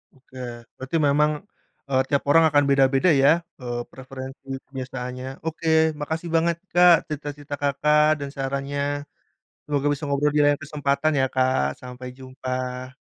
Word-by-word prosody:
Oke, 130 0 -17 0.4
berarti 130 +5 -3
memang, 150 +2 +3 0.6
eee, 130 -1 +3
tiap 140 -1 +1
orang 165 +2 +6
akan 145 0 +4
beda-beda 135 +4 +4
ya, 140 - +7 0.3
eee, 120 -1 -3
preferensi 130 +1 -9 0.2
penyelesaiannya. 130 -1 -6 0.2
Oke, 160 0 -4 0.3
makasih 160 +3 -3
banget 170 +1 +3 0.2
Kak, 175 -1 +8
cerita-cerita 145 -1 -5
Kakak, 150 +2 +3
dan 140 -1 -4
sarannya. 140 +1 -2 0.8
Semoga 145 -1 -1
bisa 145 +1 -4
ngobrol 145 +1 +1
di - - +4
lain 145 0 +3
kesempatan 145 +1 0
ya 130 - +3
Kak. 130 - +1
Sampai 125 0 -8
jumpa. 130 0 -5
140 Hz, 135 wpm, -24 LUFS, 130-150 Hz, 0.8 s, Kak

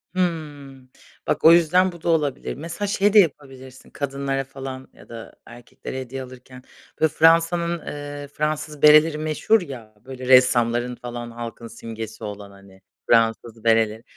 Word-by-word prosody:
Hımm. 145 -7 -4 0.4
Bak - - -1
o 160 - +10
yüzden 175 +2 +4
bu 170 -2 -14
da 170 - -2
olabilir. 150 -5 -1
Mesela 170 +7 -5
şey 205 0 +1
de 215 - +8
yapabilirsin 135 -6 -3
kadınlara 135 -1 -3
falan 135 -1 -9
ya - - -18
da 115 -1 -10
erkeklere 120 +2 -9
hediye 130 +1 -7
alırken. 130 0 -14 0.4
Böyle 160 0 +3
Fransa’nın, 165 +1 +2
eee, 145 0 -7
Fransız 150 0 -4
bereleri 150 +1 +6
meşhur 155 +8 +1
ya, 120 -9 -10
böyle, 130 -1 -8
ressamların 125 -1 +3
falan 120 -1 -8
halkın 115 0 -8
simgesi 115 -1 -9
olan, 105 -1 -8
hani, 100 -1 -18 0.3
Fransız 115 0 +1
bereleri. 110 -1 +1
135 Hz, 145 wpm, -22 LUFS, 120-155 Hz, 0.4 s, o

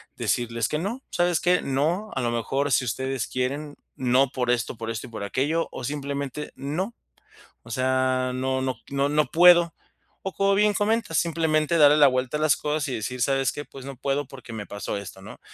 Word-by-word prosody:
decirles 115 -2 -1
que 150 - -2
no, 225 +10 -4
¿sabes 175 -1 +2
qué? 180 0 +3
No, 160 +10 0
a 130 - 0
lo 120 -1 0
mejor 135 +5 -1
si 130 +1 +3
ustedes 130 +1 -2
quieren, 140 +4 -3 0.2
no 130 +2 +3
por 125 -2 -1
esto, 125 +1 -1
por 115 0 -5
esto 115 -1 -5
y - - -13
por 110 -3 -6
aquello, 145 +10 0
o - - -7
simplemente 140 +1 -4
no. 175 - -3 0.7
O 115 - -11
sea, 130 +1 +1
no 130 +1 -1
no 130 -2 -2
no, 140 0 0
no 150 +1 +2
puedo. 175 -1 +6 0.5
O 195 - -2
como 195 0 +2
bien 210 +1 +3
comentas, 205 -4 0
simplemente 160 -1 +1
darle 150 -1 +7
la 145 -2 +7
vuelta 130 +2 0
a - - -6
las 155 -1 +4
cosas, 150 0 -1
y 130 - -2
decir: 125 +4 -4
"¿Sabes 135 +1 +2
qué? 145 - -6
Pues 135 - -11
no 135 -1 -8
puedo, 140 +2 -1
porque 125 -3 -11
me 110 -2 -5
pasó 100 0 -4
esto", 95 -1 -9
¿no? - - -11
140 Hz, 205 wpm, -25 LUFS, 125-155 Hz, 0.7 s, darle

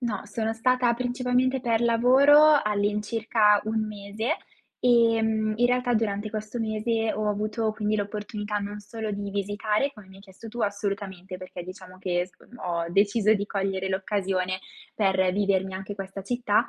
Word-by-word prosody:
No, 230 -5 -2
sono 220 +1 -2
stata 250 +1 +2
principalmente 250 +1 0
per 230 -3 +1
lavoro, 275 +6 +6
all'incirca 210 +1 +2
1 220 0 0
mese. 215 - -3 0.4
Ehm, 225 -3 +3
in 240 +2 +4
realtà 250 0 +1
durante 215 -1 -1
questo 215 +2 -4
mese, 225 0 0
ho 215 0 -1
avuto 215 +1 -1
quindi 215 0 -1
l'opportunità 210 0 -3
non 205 +1 -5
solo 215 +1 -6
di 200 0 -4
visitare, 210 +5 0
come 210 -6 -14
mi 190 - -16
hai - - -14
chiesto 195 +3 -13
tu 240 +2 -7
assolutamente. 200 -2 -3
Perché, 180 -1 -8
diciamo, 185 0 -11
che 175 -1 0
sc 180 -3 -22 0.2
ho 170 -2 -1
deciso 205 +3 +3
di 200 -1 -1
cogliere 195 -1 -2
l'occasione, 190 -1 -1 0.3
per 190 -3 +2
vivermi 190 -1 +1
anche 195 +2 -6
questa 195 0 -6
città. 240 -1 +1
210 Hz, 155 wpm, -26 LUFS, 195-230 Hz, 0.4 s, lavoro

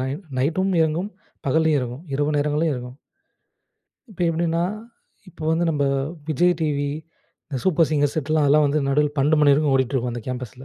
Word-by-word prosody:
நை-நைட்டும் 150 +6 -1
இயங்கும், 165 +5 0 0.4
பகலும் 160 +3 +2
இயங்கும், 125 +2 -3
இரவு 145 +2 0
நேரங்களிலும் 150 +2 +1
இயங்கும். 125 +1 -7 1.1
இப்ப 185 - -14
எப்டின்னா? 165 0 0 0.7
இப்ப 170 - -18
வந்து 165 +2 +1
நம்ம 145 -2 0 0.5
விஜய் 175 +4 +3
டிவி, 145 -2 0 0.6
இந்த 135 -4 -3
சூப்பர் 170 -3 +3
சிங்கர்ஸ் 145 -2 +1
செட் 155 -1 -2
லாம், 155 -2 +3
அதெல்லாம் 150 +2 +4
வந்து 145 +1 +1
நடுல 150 +1 +2
12:00 150 +3 +3
மணி 145 -1 +5
வரைக்கும் 145 0 +2
ஓடிட்டு 130 0 +1
இருக்கும், 125 -2 -1
அந்த 120 -2 -6
கேம்பஸ்ல. 125 0 -6
150 Hz, 165 wpm, -22 LUFS, 135-160 Hz, 1.1 s, மணி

